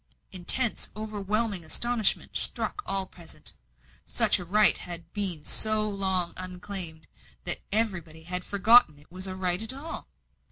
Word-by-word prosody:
Intense, 200 +6 +2
overwhelming 210 -2 -2
astonishment 225 +7 +1
struck 415 - -1
all 195 -1 -1
present. 170 -3 -2 0.5
Such - - +3
a 180 - -7
right 210 +4 +5
had 170 -2 -7
been 185 -7 -1
so 215 -1 +3
long 190 -4 0
unclaimed, 180 -3 -5 0.4
that - - +2
everybody 175 -8 -2
had 180 +2 -4
forgotten 205 -4 +5
it 145 +3 -22
was 185 +2 -4
a 185 - -5
right 180 0 0
at 225 +3 -2
all. 295 +5 -7
190 Hz, 135 wpm, -27 LUFS, 175-215 Hz, 0.5 s, right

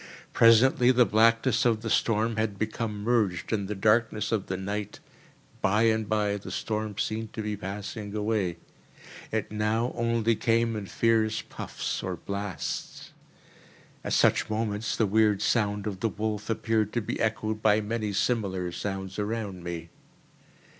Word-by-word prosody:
Presently 120 +2 +6
the 125 -1 +5
blackness 115 +2 +3
of 115 -2 +2
the 115 - -2
storm 115 0 +2
had 110 -2 -1
become 110 -1 -3
merged 110 -5 +1
in 100 -3 -1
the 105 - -3
darkness 105 +2 +2
of 110 -4 -1
the 95 - -2
night. 100 +2 -4 0.6
By 105 +3 +3
and 110 -2 +2
by 105 -1 +1
the 100 - -9
storm 110 -2 -3
seemed 110 0 -3
to 110 - -4
be 105 0 -2
passing 100 +2 -6
away: 105 -5 0 0.7
it - - -2
now 110 +3 0
only 115 -1 +1
came 115 +1 +1
in 105 -2 -5
fierce 110 0 +1
puffs - - -5
or - - -3
blasts. 100 -1 -5 0.9
At - - -2
such - - +3
moments 110 0 -1
the 110 - +3
weird 105 0 +3
sound 105 -3 +1
of 100 -3 -4
the 115 - 0
wolf 105 0 -3
appeared 110 -1 0
to 120 - 0
be - - -4
echoed 110 -1 -1
by 110 -1 +4
many 110 0 -2
similar 95 -5 0
sounds 95 +1 -4
around 105 -4 -3
me. 85 -1 -5
110 Hz, 155 wpm, -27 LUFS, 100-115 Hz, 0.9 s, Presently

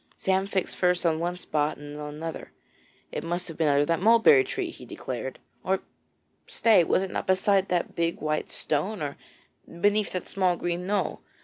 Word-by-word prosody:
Sam 190 0 +1
fixed 195 -2 -2
first 180 -1 +2
on 160 -1 +2
one 175 +1 -1
spot 150 -4 -1
and 145 0 -9
then 150 - -7
on 150 0 -6
another 160 +1 -6 0.6
it - - -4
must 175 +2 -3
have 165 - -8
been 160 -1 +1
under 145 0 +4
that 165 +3 0
mulberry 230 - +6
tree, 390 -3 -3
he - - -13
declared. - - -5 0.3
Or - - 0 0.7
stay, 215 -6 +4
was 185 - +2
it 190 - -5
not - - -3
beside 190 +1 +3
that 175 -1 -1
big 170 0 -1
white 155 0 -1
stone, 170 +5 -2
or 145 -1 -3 0.6
beneath 205 +2 +2
that 185 - -4
small 185 -2 +1
green 175 +1 -3
knoll? 195 -4 -1
180 Hz, 190 wpm, -27 LUFS, 160-195 Hz, 0.7 s, mulberry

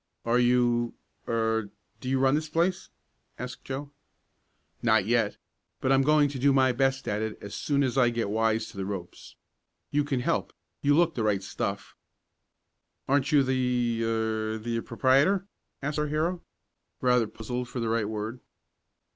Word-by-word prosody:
"Are 120 +1 +3
you 120 -1 +2 0.3
er 110 -2 0 0.3
do 130 - -5
you 135 - +2
run 135 0 +3
this 155 +1 0
place?" 175 +4 0 0.5
asked 125 +1 -7
Joe. 140 +2 -5 0.9
"Not 110 -4 +3
yet, 115 -2 +1 0.4
but 130 - 0
I'm 135 0 +5
going 150 +1 +4
to 135 -2 -6
do 140 +2 +4
my 130 -1 +4
best 135 +1 0
at 105 +1 -1
it 110 -1 -3
as 100 - -9
soon 140 -1 0
as 130 0 +1
I 120 -2 +5
get 115 -4 -2
wise 110 0 +1
to - - -14
the 95 - -2
ropes. 95 -4 -7 0.6
You 145 0 +2
can 135 -3 -1
help - - -1 0.3
you 145 +1 +3
look 170 -1 +3
the 120 - -3
right 105 -3 +1
stuff." - - -4 1.1
"Aren't 140 0 +2
you 145 -2 +5
the 125 -3 0
er 110 -1 -1
the 115 +1 -2
proprietor?" 140 +13 +2 0.4
asked 150 +2 -1
our 150 - 0
hero, 165 +4 -1 0.6
rather 125 -3 +3
puzzled 125 +3 -5
for 125 0 -5
the 115 - -1
right 110 -2 0
word. 110 +3 -4
125 Hz, 165 wpm, -28 LUFS, 110-140 Hz, 1.1 s, I'm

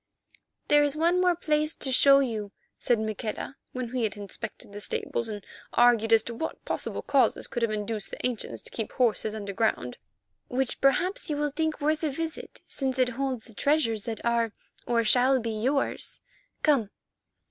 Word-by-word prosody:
"There 295 -1 +6
is 290 0 +1
one 340 +3 +3
more 360 -1 +4
place 305 -1 0
to 265 - 0
show 275 +2 +7
you," 220 -6 -2 0.3
said 240 - +2
Maqueda, 220 +4 -4 0.2
when 255 -2 -4
we 255 -1 -1
had 215 -2 -1
inspected 205 +1 -7
the 205 - -6
stables 415 - -2
and 205 -2 -6 0.3
argued 235 -2 +4
as 225 -1 +6
to 235 - -5
what 320 +8 -5
possible - - -3
causes - - +2
could 240 - -4
have 230 - +2
induced 210 0 -3
the - - -5
ancients 245 -3 -3
to - - -8
keep 225 - -4
horses 220 -3 +1
underground, 200 - -1 0.5
"which 260 0 -1
perhaps 355 +7 +2
you 295 - -1
will 295 0 0
think 315 +1 -1
worth 310 +1 +1
a 310 - +2
visit, 320 +3 -5
since 265 -2 -2
it 255 -1 +3
holds 255 -1 -3
the 230 - -15
treasures 230 -5 +1
that 230 -1 -5
are, 235 -2 +1 0.3
or 235 -1 +2
shall 255 +4 +4
be, 230 -1 -3
yours. 255 +6 -1 0.4
Come!" 270 -9 +3
245 Hz, 180 wpm, -27 LUFS, 220-290 Hz, 0.5 s, show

